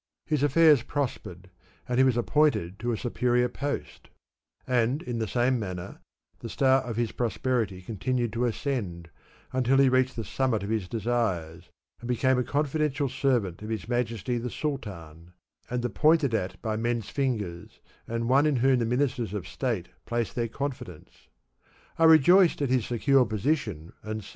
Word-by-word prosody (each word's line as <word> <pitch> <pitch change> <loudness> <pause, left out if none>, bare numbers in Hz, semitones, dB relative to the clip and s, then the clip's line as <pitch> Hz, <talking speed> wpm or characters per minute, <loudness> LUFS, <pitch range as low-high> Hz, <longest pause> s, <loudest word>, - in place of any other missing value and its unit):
His 150 -4 0
affairs 145 -1 +5
pros 140 +1 -2
pered, 90 +1 -11 0.4
and 125 0 0
he - - +7
was 130 -3 +3
appointed 115 - +1
to 120 +1 -1
a 115 - -1
superior 125 +1 +1
post; 140 +4 -5 0.6
and 125 +4 +1
in 120 -2 -4
the 110 - -1
same 125 +4 +1
manner 90 -4 -6 0.4
the 115 - -7
star 135 +2 +3
of 120 -3 -5
his 115 -2 0
prosperity 115 -5 -1
con 110 +3 -7
tinued 120 +2 -1
to 120 +2 0
ascend 105 - -3 0.4
until 130 +1 +2
he 135 -1 +5
reached 130 0 +2
the 115 - -4
summit 115 -1 -1
of 100 - -4
his 110 -5 -1
desires, 95 -7 -2 0.3
and 120 - -8
became 125 +1 +2
a - - +1
confidential 145 0 -1
servant 120 -10 0
of 105 - -7
his 110 -1 -4
Majesty 120 -1 -1
the 125 +1 -4
Sultan, 90 - -6 0.4
and 125 0 -2
the 120 - 0
pointed 155 -1 +3
at 95 -4 -2
by 110 -2 -1
merCs 115 -1 -2
fingers 105 -11 -2
^ - - -28 0.3
and 115 0 -1
one 135 +4 +4
in 150 - +2
whom 130 +1 +3
the 115 - 0
ministers 125 -4 -1
of 100 - -5
State 115 -10 -3 0.2
placed 120 -1 -2
their 120 -1 -1
confidence, 125 - -7 0.7
I 165 - +5
rejoiced 165 +3 +6
at 140 - 0
his 130 -4 +1
secure 130 +3 +3
position 110 - -2
and 110 0 -5
said, - - -12
■'J. - - -11
120 Hz, 175 wpm, -27 LUFS, 110-135 Hz, 0.7 s, he